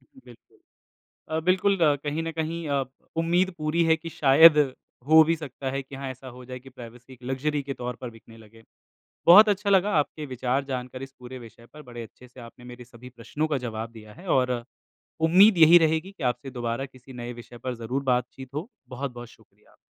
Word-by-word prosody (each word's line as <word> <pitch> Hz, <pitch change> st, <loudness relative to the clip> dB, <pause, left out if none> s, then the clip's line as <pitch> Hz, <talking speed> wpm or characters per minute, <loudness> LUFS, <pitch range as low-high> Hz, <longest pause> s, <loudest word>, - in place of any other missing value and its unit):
बिल्कुल, 125 Hz, -3 st, -19 dB, 0.7 s
अ, 160 Hz, 0 st, -1 dB
बिल्कुल, 190 Hz, +2 st, +2 dB, 0.3 s
कहीं 150 Hz, +2 st, -2 dB
न 165 Hz, -, -3 dB
कहीं 160 Hz, 0 st, -4 dB
अ, 140 Hz, -1 st, 0 dB, 0.3 s
उम्मीद 175 Hz, +3 st, +1 dB
पूरी 155 Hz, +2 st, 0 dB
है 160 Hz, 0 st, +4 dB
कि 165 Hz, +1 st, -9 dB
शायद 150 Hz, +3 st, +6 dB, 0.5 s
हो 160 Hz, 0 st, +8 dB
भी 165 Hz, +1 st, +1 dB
सकता 140 Hz, -3 st, -6 dB
है 135 Hz, +1 st, -3 dB
कि 135 Hz, +1 st, -13 dB
हाँ, 135 Hz, 0 st, -6 dB
ऐसा 130 Hz, +1 st, -10 dB
हो 125 Hz, 0 st, -12 dB
जाए 125 Hz, 0 st, -8 dB
कि 135 Hz, -, -14 dB
प्राइवेसी 125 Hz, 0 st, -13 dB
एक 125 Hz, -, -16 dB
लक्ज़री 140 Hz, +3 st, -2 dB
के 135 Hz, 0 st, -5 dB
तौर 125 Hz, -1 st, -5 dB
पर 125 Hz, -2 st, -6 dB
बिकने 115 Hz, 0 st, -17 dB
लगे। 115 Hz, +1 st, -17 dB, 0.6 s
बहुत 205 Hz, +6 st, +9 dB
अच्छा 205 Hz, 0 st, 0 dB
लगा 195 Hz, +1 st, +4 dB
आपके 150 Hz, +1 st, -2 dB
विचार 130 Hz, +1 st, -2 dB
जानकर, 130 Hz, -1 st, -6 dB
इस 135 Hz, 0 st, -9 dB
पूरे 125 Hz, +1 st, -9 dB
विषय 115 Hz, -1 st, -14 dB
पर 150 Hz, -, -12 dB
बड़े 120 Hz, -3 st, -9 dB
अच्छे 125 Hz, +3 st, -14 dB
से 125 Hz, +1 st, -15 dB
आपने 120 Hz, +1 st, -13 dB
मेरे 125 Hz, 0 st, -11 dB
सभी 120 Hz, +1 st, -14 dB
प्रश्नों 145 Hz, +6 st, -3 dB
का 145 Hz, -, 0 dB
जवाब 110 Hz, 0 st, -5 dB
दिया 110 Hz, -2 st, -13 dB
है, 185 Hz, -, -14 dB
और 125 Hz, -4 st, +1 dB, 0.6 s
उम्मीद 190 Hz, +3 st, +6 dB
यही 165 Hz, +2 st, +8 dB
रहेगी 160 Hz, +3 st, 0 dB
कि 170 Hz, -, -12 dB
आपसे 125 Hz, +2 st, -2 dB
दोबारा 120 Hz, +1 st, -3 dB
किसी 130 Hz, 0 st, -16 dB
नए 120 Hz, 0 st, -7 dB
विषय 120 Hz, 0 st, -12 dB
पर 125 Hz, +1 st, -4 dB
ज़रूर 120 Hz, +4 st, -4 dB
बातचीत 125 Hz, +1 st, -2 dB
हो। 155 Hz, +9 st, -4 dB, 0.2 s
बहुत-बहुत 125 Hz, -2 st, -6 dB
शुक्रिया। -, -, -24 dB
130 Hz, 200 wpm, -25 LUFS, 125-160 Hz, 0.7 s, बहुत